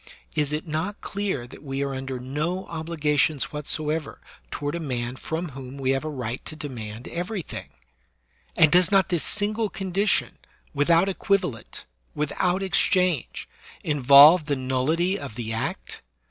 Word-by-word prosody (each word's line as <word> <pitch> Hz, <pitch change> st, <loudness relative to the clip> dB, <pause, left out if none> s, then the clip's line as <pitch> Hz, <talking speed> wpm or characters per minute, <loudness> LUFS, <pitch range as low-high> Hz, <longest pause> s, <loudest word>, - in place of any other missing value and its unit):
Is 150 Hz, -2 st, 0 dB
it 150 Hz, +1 st, -2 dB
not 160 Hz, +6 st, -3 dB
clear 195 Hz, -11 st, -3 dB
that 125 Hz, -, -13 dB
we 135 Hz, -1 st, -3 dB
are 140 Hz, -1 st, -2 dB
under 130 Hz, -1 st, -4 dB
no 150 Hz, +9 st, -3 dB
obli 165 Hz, 0 st, -5 dB
gations 150 Hz, -1 st, +2 dB
whatsoever 150 Hz, +1 st, -1 dB, 0.3 s
toward 145 Hz, -, -3 dB
a 170 Hz, -, -2 dB
man 125 Hz, -5 st, -3 dB
from 160 Hz, +5 st, -4 dB
whom 135 Hz, 0 st, -9 dB
we 135 Hz, -1 st, 0 dB
have 135 Hz, +1 st, 0 dB
a 155 Hz, -, -3 dB
right 125 Hz, -4 st, -4 dB
to -, -, -7 dB
demand 120 Hz, -7 st, -7 dB
everything? 180 Hz, +1 st, -5 dB, 0.9 s
And 155 Hz, -2 st, +6 dB
does 180 Hz, +1 st, +4 dB
not 195 Hz, -3 st, +4 dB
this 175 Hz, -3 st, 0 dB
single 215 Hz, +1 st, 0 dB
condition, 195 Hz, +1 st, 0 dB, 0.3 s
without 165 Hz, +6 st, +3 dB
equivalent, 185 Hz, -, -1 dB, 0.3 s
without 180 Hz, +6 st, 0 dB
exchange, 180 Hz, -4 st, +1 dB, 0.4 s
involve 145 Hz, +3 st, +7 dB
the 145 Hz, -, +1 dB
nullity 140 Hz, +9 st, 0 dB
of 135 Hz, -7 st, -8 dB
the 115 Hz, -2 st, -4 dB
act 115 Hz, -, -4 dB
150 Hz, 145 wpm, -25 LUFS, 135-180 Hz, 0.9 s, involve